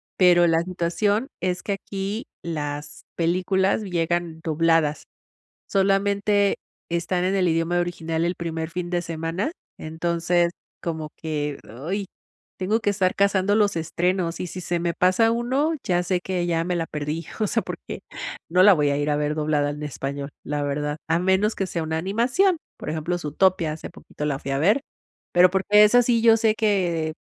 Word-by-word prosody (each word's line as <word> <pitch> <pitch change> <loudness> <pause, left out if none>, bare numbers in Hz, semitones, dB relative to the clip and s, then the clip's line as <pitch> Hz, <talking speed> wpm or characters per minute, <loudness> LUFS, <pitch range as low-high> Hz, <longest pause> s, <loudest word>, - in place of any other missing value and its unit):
pero 175 -2 +5
la 165 0 +3
situación 185 +7 0
es 180 -1 -1
que 200 - -1
aquí 195 +2 -4 0.2
las 150 -2 -5
películas 185 +4 +1
llegan 175 -3 -1
dobladas, 165 -1 +2 0.6
solamente 200 +1 +2 0.3
están 170 +1 -1
en 190 +1 +1
el 185 -2 +2
idioma 165 +2 +1
original 165 -1 -2
el 175 - -1
primer 160 -1 -4
fin 175 0 -4
de 175 0 0
semana. 165 - -3 0.3
Entonces 170 +2 0 0.3
como 160 -2 -4
que, 150 -3 -3 0.3
¡ay!, 200 +1 -1 0.5
tengo 210 +5 +1
que 205 - 0
estar 190 -2 +1
cazando 200 0 +2
los 205 -4 +3
estrenos, 170 +1 -1
y 180 - -3
si 185 +2 -7
se 175 0 -1
me 170 0 -1
pasa 185 +5 +3
1, 260 +7 +1
ya 180 -1 +1
sé, 180 0 0
que 180 -2 -2
ya 165 -1 0
me 180 0 -1
la 165 - -1
perdí, 150 +2 -4 0.2
o 210 - +2
sea, - - +1
porque - - -7 0.5
no 180 +2 +4
la 205 - +9
voy 145 -3 +2
a 140 - 0
ir 145 +1 0
a 145 - +2
ver 150 +1 -1
doblada 150 -1 +1
en 150 +1 -7
español, 140 0 -4 0.2
la 145 0 -2
verdad. 145 +1 -2
A 165 +1 +3
menos 190 +4 +2
que 195 - -1
sea 170 -3 -3
una 160 0 -2
animación, 245 - +2 0.2
por - - -6
ejemplo, 160 +3 -2
Zootopia, 170 0 +1
hace 155 - -8
poquito 150 - -9
la 145 -2 -1
fui 135 - -5
a 135 - 0
ver, 205 - +4 0.5
pero, 180 +1 +7
porque 205 +3 +5
esa 245 +4 +6
sí 235 -1 +2
yo 225 -1 +6
sé 220 -1 +3
que, 175 -8 +1
175 Hz, 180 wpm, -24 LUFS, 160-195 Hz, 0.6 s, la